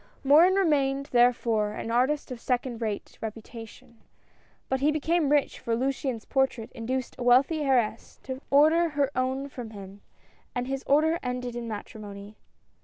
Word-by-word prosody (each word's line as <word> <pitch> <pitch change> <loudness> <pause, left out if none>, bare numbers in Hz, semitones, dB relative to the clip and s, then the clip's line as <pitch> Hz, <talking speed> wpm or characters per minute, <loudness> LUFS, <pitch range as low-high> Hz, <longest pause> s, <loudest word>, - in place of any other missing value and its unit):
Morin 320 +7 +6
remained 280 -7 +1
therefore, 235 -3 +2
an 230 - -5
artist 265 +4 +1
of 250 - -6
second 245 -2 -2
rate 215 -3 -4
reputation; 225 +1 -9 0.7
but 265 - 0
he 285 +3 +3
became 310 0 +1
rich, 290 -1 +1
for 230 - -1
Luciane's 260 -2 -2
portrait 265 -4 0
induced 255 +2 -4
a - - -3
wealthy 265 +6 +4
heiress 245 -6 0
to 260 0 -6
order 315 +4 +5
her 285 -2 0
own 260 +2 -1
from 245 -4 -8
him, 200 -1 -11 0.5
and 245 0 -1
this 270 +1 -4
order 315 +4 +3
ended 250 -1 -4
in 240 -1 -5
matrimony. 205 -1 -8
255 Hz, 150 wpm, -27 LUFS, 230-280 Hz, 0.7 s, Morin